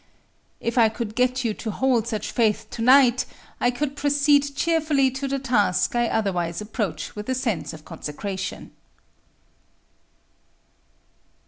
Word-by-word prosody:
If 235 +1 -1
I 225 -1 +6
could 220 -1 -5
get 250 +1 +1
you 220 - +1
to 220 - -6
hold 240 0 +1
such 215 -3 -3
faith 220 -1 +1
to 230 - -5
night, 255 0 +5 0.3
I 245 - +3
could 280 +3 -2
proceed 285 0 +2
cheerfully 305 -4 +2
to 265 +2 -4
the 275 0 -1
task 240 -7 +1
I 240 0 +2
otherwise 180 -7 -1
approach 210 -7 -4
with 210 +3 -6
a 260 - +1
sense 230 -8 -2
of 155 -2 -12
consecration. 190 +6 -6
240 Hz, 135 wpm, -24 LUFS, 210-270 Hz, 0.3 s, I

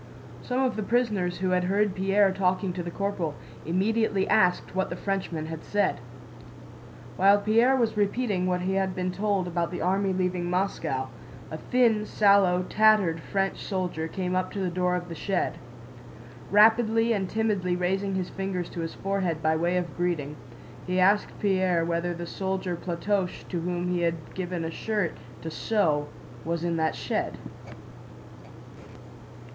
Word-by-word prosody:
Some 250 0 -2
of 255 -3 0
the - - -1
prisoners 210 -6 0
who 185 0 -1
had 180 0 +2
heard 200 +1 +1
Pierre 195 +1 +3
talking 185 0 0
to 175 - -4
the 175 - -5
corporal 180 -5 -2 0.3
immediately 195 +2 +1
asked 180 -1 +2
what 190 +1 0
the - - -4
Frenchman 185 -5 -3
had 160 0 -7
said. 205 0 0 1.2
While 200 +2 +6
Pierre 230 +5 +3
was 235 -4 +1
repeating 205 -2 0
what 180 -1 0
he 190 +1 -1
had 190 -1 0
been 185 0 -1
told 200 -1 0
about 170 -1 -1
the 180 - -4
army 195 +1 +1
leaving 180 -1 -1
Moscow, 165 -8 -1 0.4
a 155 - -5
thin, 225 -2 +2
sallow, 200 -3 +4
tattered 210 -5 +3
French 195 +4 -1
soldier 180 -5 -2
came 180 +1 -3
up 185 - 0
to 200 - -4
the 185 -2 -1
door 180 0 +1
of 175 -1 -4
the 170 - -6
shed. 190 +2 -2 0.9
Rapidly 225 +2 +5
and 190 -3 -1
timidly 205 -5 0
raising 190 +2 -1
his 185 -1 -2
fingers 190 -3 -3
to - - -6
his 165 -1 -4
forehead 190 -5 -2
by 160 0 +3
way 170 +3 +1
of 170 -6 -3
greeting, 165 -5 -1 0.5
he 180 +1 0
asked 200 +3 +2
Pierre 185 -4 +2
whether 170 +1 -1
the 170 0 -5
soldier 190 0 -3
Platoche 180 +2 -2
to 175 -3 -2
whom 175 +1 -2
he 180 -1 0
had 165 -2 -2
given 180 -2 -3
a 165 - -3
shirt 210 -2 -1 0.3
to 160 - -4
sew 155 -8 +1 0.4
was 170 +1 -2
in 170 -1 0
that 160 -1 0
shed. - - -2
185 Hz, 160 wpm, -27 LUFS, 175-200 Hz, 1.2 s, While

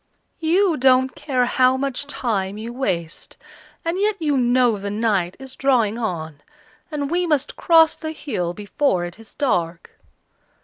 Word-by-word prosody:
"You 335 +1 +2
don't 260 0 +3
care 255 -4 0
how 255 +1 +3
much 275 +1 -3
time 205 -8 -2
you 230 +2 -6
waste, 170 -11 -3 0.5
and 335 +3 -1
yet 420 +1 +2
you 300 -3 +1
know 245 -3 +3
the 200 +1 -4
night 200 -4 0
is 265 -1 -9
drawing 240 -5 +1
on, 160 -9 -4 0.5
and 290 -2 -3
we 355 +1 +1
must 295 -3 0
cross 325 -2 +5
the 315 - -6
hill 185 - -3
before 205 -2 0
it 175 +4 -9
is 225 - -13
dark!" 175 - -1
255 Hz, 150 wpm, -21 LUFS, 205-290 Hz, 0.5 s, cross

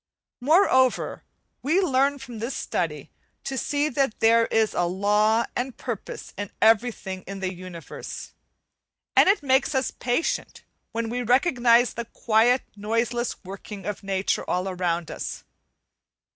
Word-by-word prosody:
Moreover, 260 -3 +3 0.4
we 310 +8 +2
learn 280 -5 +2
from 250 -4 -9
this 235 +5 -3
study - - -3 0.3
to 270 - -4
see 290 +3 0
that 270 -4 0
there 230 +1 +5
is 220 -1 +1
a 175 - +1
law 210 +5 +2
and 250 0 -3
purpose 235 -6 -6
in 205 -1 -4
everything 220 -4 +2
in 195 +1 -6
the 190 -1 -2
Universe, 175 -4 -8 0.8
and - - +6
it 395 -6 +3
makes 265 +1 +2
us 265 0 +1
patient 245 +7 -2 0.3
when 230 0 -2
we 250 +1 -2
recognize 245 -1 +4
the 235 - -4
quiet 235 +2 +2
noiseless 230 +3 -1
working 195 +1 -9
of 210 -2 -4
nature 195 -1 -1
all 180 +1 0
around 175 -3 -2
us. - - -5
230 Hz, 135 wpm, -25 LUFS, 200-260 Hz, 0.8 s, and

